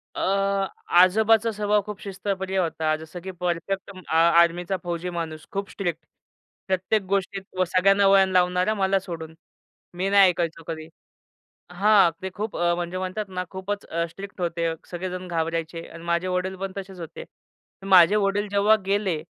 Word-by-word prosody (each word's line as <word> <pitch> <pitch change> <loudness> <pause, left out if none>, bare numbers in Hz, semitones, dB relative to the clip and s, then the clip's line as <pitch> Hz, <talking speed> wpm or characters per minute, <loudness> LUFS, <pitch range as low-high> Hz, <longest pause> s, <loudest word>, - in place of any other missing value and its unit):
अ, - - -4 0.8
आजोबांचा 220 +4 +5
स्वभाव 210 0 +1
खूप 210 -1 -7
शिस्तप्रिय 190 -1 -3
होता. 160 -3 0
जसं 160 +2 -9
की 190 - -7
परफेक्ट 180 +2 -3
अ 185 -4 -7
आर्मीचा 170 +2 +4
फौजी 175 +1 -3
माणूस, 160 -2 -5
खूप 195 0 -3
स्ट्रिक्ट. 170 -5 -4 0.6
प्रत्येक 190 +3 +1
गोष्टीत 195 0 -1 0.2
व 185 - +4
सगळ्यांना 195 +2 +3
वळण 195 -1 +6
लावणारा, 180 +3 +2
मला 195 -1 +2
सोडून. 165 -4 -7 0.6
मी 185 +2 -1
नाही 200 -2 +7
ऐकायचो 165 -2 -3
कधी. 160 -1 -5 0.8
हां, 195 -1 +5
ते 190 - -3
खूप 215 +1 -4
अ, 175 0 +2
म्हणजे 175 +1 -4
म्हणतात 185 +3 -4
ना, 180 -1 -4
खूपच 200 +2 -5 0.2
स्ट्रिक्ट 195 +2 -10
होते. 170 -1 -1 0.2
सगळेजण 185 +1 -5
घाबरायचे 165 0 -3
अन् 165 - -11
माझे 170 +2 0
वडील 185 +1 -2
पण 195 0 -5
तसेच 190 -1 -7
होते. 165 -1 -8 0.6
माझे 190 +1 +7
वडील 205 0 +1
जेव्हा 205 +2 +4
गेले 195 -5 0
185 Hz, 150 wpm, -24 LUFS, 170-195 Hz, 0.8 s, नाही